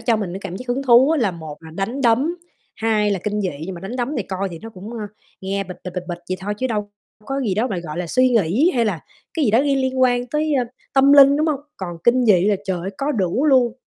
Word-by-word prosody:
cho 230 Hz, -1 st, +2 dB
mình 195 Hz, -5 st, -4 dB
cái 190 Hz, -, -6 dB
cảm 185 Hz, -2 st, -6 dB
giác 250 Hz, +4 st, -10 dB
hứng 255 Hz, +3 st, -1 dB
thú 255 Hz, +3 st, +6 dB
á, 320 Hz, -, +2 dB
là 205 Hz, -5 st, +2 dB
một 160 Hz, -3 st, -8 dB
là 160 Hz, -, -11 dB
đánh 200 Hz, -, -3 dB
đấm, 265 Hz, +7 st, +2 dB, 0.4 s
hai 215 Hz, -2 st, +1 dB
là 195 Hz, -, 0 dB
kinh 210 Hz, 0 st, -1 dB
dị. 190 Hz, -, 0 dB, 0.2 s
Nhưng 190 Hz, -, -5 dB
mà 170 Hz, -, -9 dB
đánh 195 Hz, +7 st, -6 dB
đấm 255 Hz, +4 st, -2 dB
thì 230 Hz, -, 0 dB
coi 195 Hz, +1 st, -3 dB
thì 170 Hz, -, -8 dB
nó 225 Hz, -, -8 dB
cũng, 200 Hz, +2 st, -10 dB
ờ, 235 Hz, -, -6 dB, 0.4 s
nghe 195 Hz, +1 st, -2 dB
bịch, 180 Hz, -1 st, -9 dB
bịch, 180 Hz, -, -5 dB
bịch, 180 Hz, -, -3 dB
bịch 175 Hz, -1 st, -4 dB
vậy 185 Hz, -, -1 dB
thôi, 205 Hz, +2 st, -3 dB
chứ 260 Hz, -, 0 dB
đâu 210 Hz, -3 st, -3 dB, 0.4 s
có 275 Hz, 0 st, -2 dB
gì 215 Hz, -8 st, 0 dB
đó 220 Hz, +5 st, +1 dB
mà, 195 Hz, -6 st, -2 dB
gọi 170 Hz, -2 st, -6 dB
là, 180 Hz, -, -2 dB
suy 255 Hz, +9 st, +3 dB
nghĩ 230 Hz, -, +3 dB
hay 235 Hz, -, +2 dB
là 195 Hz, -7 st, -1 dB, 0.3 s
cái 315 Hz, -4 st, +1 dB
gì 215 Hz, -, +3 dB
đó 225 Hz, -, +4 dB
liên 275 Hz, -1 st, +2 dB
liên 260 Hz, 0 st, -1 dB
quan 245 Hz, -1 st, +2 dB
tới 305 Hz, +3 st, -1 dB, 0.4 s
tâm 275 Hz, +1 st, +5 dB
linh, 280 Hz, 0 st, +8 dB
đúng 310 Hz, -, +1 dB
hông? 295 Hz, -3 st, 0 dB, 0.2 s
Còn 175 Hz, -3 st, -6 dB
kinh 245 Hz, +1 st, +4 dB
dị 190 Hz, -5 st, +4 dB
là, 210 Hz, -1 st, +3 dB
trời 190 Hz, -2 st, -2 dB
ơi, 190 Hz, -, -4 dB
có 285 Hz, +2 st, 0 dB
đủ 210 Hz, -, 0 dB
luôn. 255 Hz, -5 st, +4 dB
225 Hz, 285 wpm, -21 LUFS, 190-260 Hz, 0.4 s, linh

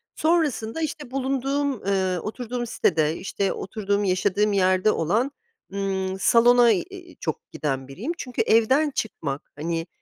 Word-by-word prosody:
sonrasında 315 Hz, -5 st, +1 dB
işte 295 Hz, -4 st, -4 dB
bulunduğum, 275 Hz, 0 st, -1 dB
ııı, 190 Hz, -3 st, +1 dB
oturduğum 240 Hz, +2 st, -4 dB
sitede, 155 Hz, -5 st, +1 dB
işte 195 Hz, +1 st, -2 dB
oturduğum, 205 Hz, 0 st, -2 dB
yaşadığım 200 Hz, +2 st, +1 dB
yerde 185 Hz, +2 st, +3 dB
olan, 220 Hz, -, 0 dB, 0.4 s
ımm, 190 Hz, -1 st, -2 dB
salona, 240 Hz, +2 st, +6 dB
iii, 355 Hz, -, -4 dB
çok -, -, -5 dB
giden 135 Hz, -3 st, -3 dB
biriyim. 210 Hz, -, -5 dB
Çünkü 250 Hz, -6 st, -3 dB
evden 260 Hz, +7 st, +3 dB
çıkmak, 150 Hz, -, -4 dB
hani 165 Hz, +2 st, -3 dB
215 Hz, 125 wpm, -24 LUFS, 185-260 Hz, 0.4 s, salona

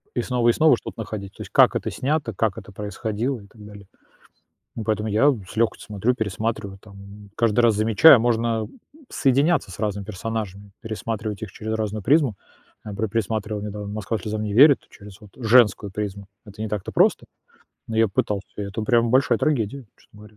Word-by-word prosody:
И -, -, +1 dB
снова, 125 Hz, -2 st, +1 dB
и -, -, +5 dB
снова 155 Hz, -3 st, +4 dB
что-то -, -, -10 dB
находить, 100 Hz, -3 st, -7 dB
то -, -, -12 dB
есть -, -, -9 dB
как -, -, +5 dB
это -, -, -2 dB
снято, 140 Hz, -4 st, -1 dB
как 105 Hz, +1 st, -1 dB
это 100 Hz, -2 st, -10 dB
происходило 110 Hz, +5 st, -3 dB
и 100 Hz, -, -15 dB
так 105 Hz, +1 st, -16 dB
далее. 100 Hz, -1 st, -12 dB, 0.9 s
Ну, 115 Hz, -, -4 dB
поэтому 110 Hz, 0 st, -1 dB
я 110 Hz, +8 st, +4 dB
с 105 Hz, -6 st, -7 dB
лёгкостью 115 Hz, 0 st, 0 dB
смотрю, 105 Hz, +4 st, 0 dB
пересматриваю 110 Hz, -2 st, -3 dB
там, 100 Hz, 0 st, -14 dB
каждый 115 Hz, 0 st, +2 dB
раз 115 Hz, -2 st, +4 dB
замечая, 110 Hz, +7 st, +7 dB
можно, 115 Hz, -1 st, 0 dB
м, -, -, -18 dB, 0.3 s
соединяться 140 Hz, -, +2 dB
с 90 Hz, -, -10 dB
разными 105 Hz, -2 st, -2 dB
персонажами, 100 Hz, -1 st, -5 dB
пересматривать 110 Hz, -1 st, -5 dB
их 105 Hz, -4 st, -6 dB
через 110 Hz, 0 st, -5 dB
разную 110 Hz, -1 st, -3 dB
призму. 140 Hz, 0 st, +3 dB, 0.5 s
Я 105 Hz, -, -7 dB
пре 110 Hz, +2 st, -2 dB
пересматривал 105 Hz, 0 st, -2 dB
недавно 105 Hz, -1 st, -6 dB
"Москва 110 Hz, +1 st, -3 dB
слезам 105 Hz, +2 st, -4 dB
не 105 Hz, -1 st, -3 dB
верит" 140 Hz, +4 st, +7 dB
через 100 Hz, 0 st, -14 dB
вот 105 Hz, -3 st, -15 dB
женскую 110 Hz, -4 st, +3 dB
призму. 100 Hz, -1 st, -5 dB, 0.2 s
Это 105 Hz, 0 st, -13 dB
не 110 Hz, -, -3 dB
так-то 105 Hz, -3 st, -4 dB
просто, -, -, +3 dB, 0.6 s
но 110 Hz, -, -4 dB
я 115 Hz, 0 st, +4 dB
пытался. 100 Hz, +1 st, -2 dB
Это, 105 Hz, +1 st, -4 dB
прямо, 115 Hz, +1 st, +2 dB
большая 130 Hz, -2 st, +3 dB
трагедия, 135 Hz, -2 st, -1 dB
честно 105 Hz, -, -21 dB
говоря 105 Hz, 0 st, -16 dB
110 Hz, 190 wpm, -23 LUFS, 100-115 Hz, 0.9 s, замечая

